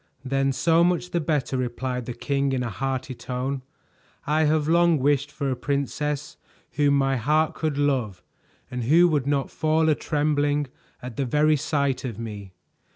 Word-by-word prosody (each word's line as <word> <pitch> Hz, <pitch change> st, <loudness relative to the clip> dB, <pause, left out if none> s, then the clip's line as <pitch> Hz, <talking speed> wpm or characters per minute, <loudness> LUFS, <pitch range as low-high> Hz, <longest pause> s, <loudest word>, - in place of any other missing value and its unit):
"Then 135 Hz, +1 st, +1 dB
so 165 Hz, +5 st, +3 dB
much 180 Hz, 0 st, 0 dB
the 175 Hz, -, +1 dB
better," 145 Hz, -4 st, -1 dB
replied 125 Hz, 0 st, -3 dB
the 120 Hz, -, -4 dB
king 140 Hz, +2 st, -1 dB
in 125 Hz, -1 st, 0 dB
a 120 Hz, -, -3 dB
hearty 130 Hz, +3 st, -3 dB
tone. 125 Hz, +2 st, -4 dB, 0.6 s
"I 155 Hz, +1 st, +2 dB
have 150 Hz, 0 st, +2 dB
long 170 Hz, 0 st, +4 dB
wished 140 Hz, +1 st, +1 dB
for 140 Hz, -2 st, -2 dB
a -, -, 0 dB
princess 140 Hz, +2 st, -2 dB, 0.3 s
whom 145 Hz, -1 st, +2 dB
my 135 Hz, -1 st, +1 dB
heart 155 Hz, +6 st, +1 dB
could 155 Hz, -3 st, -2 dB
love, 125 Hz, -11 st, 0 dB, 0.5 s
and 125 Hz, -2 st, -3 dB
who 165 Hz, +7 st, +6 dB
would 145 Hz, -4 st, 0 dB
not 140 Hz, -1 st, 0 dB
fall 160 Hz, 0 st, +1 dB
a -, -, +5 dB
trembling 145 Hz, -1 st, 0 dB, 0.4 s
at 125 Hz, -2 st, -7 dB
the 140 Hz, -, 0 dB
very 150 Hz, +4 st, +3 dB
sight 140 Hz, -3 st, -1 dB
of 120 Hz, -6 st, -5 dB
me. 105 Hz, -4 st, -7 dB
140 Hz, 170 wpm, -25 LUFS, 130-150 Hz, 0.6 s, who